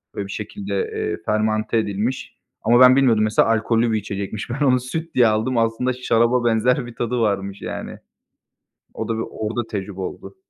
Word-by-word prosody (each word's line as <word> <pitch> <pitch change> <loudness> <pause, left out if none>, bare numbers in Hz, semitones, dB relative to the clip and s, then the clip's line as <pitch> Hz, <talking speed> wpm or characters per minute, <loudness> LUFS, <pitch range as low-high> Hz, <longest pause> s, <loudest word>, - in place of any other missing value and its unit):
Böyle 100 - -4
bir - - -8
şekilde, 195 - -5 0.2
eee, 430 -2 -2
fermante 110 +1 0
edilmiş 110 +4 -2 0.3
ama 120 +2 +4
ben 130 0 +8
bilmiyordum 120 -6 +4
mesela 110 0 +3
alkollü 115 +1 +2
bir 110 - +1
içecekmiş. 100 +2 -5
Ben 135 +5 -1
onu 130 -2 +4
süt 160 +7 -5
diye 125 -2 +6
aldım, 110 +4 0
aslında 115 +3 +1
şaraba 120 0 +1
benzer 120 +3 +2
bir 120 -1 -10
tadı 120 +1 -2
varmış 100 -3 -1
yani. - - -6 1.0
O - - -4
da, 115 - -1
bir 115 - -1
orda 110 +2 -3
tecrübe 95 -1 -5
oldu. 95 - -7
115 Hz, 175 wpm, -21 LUFS, 110-125 Hz, 1.0 s, ben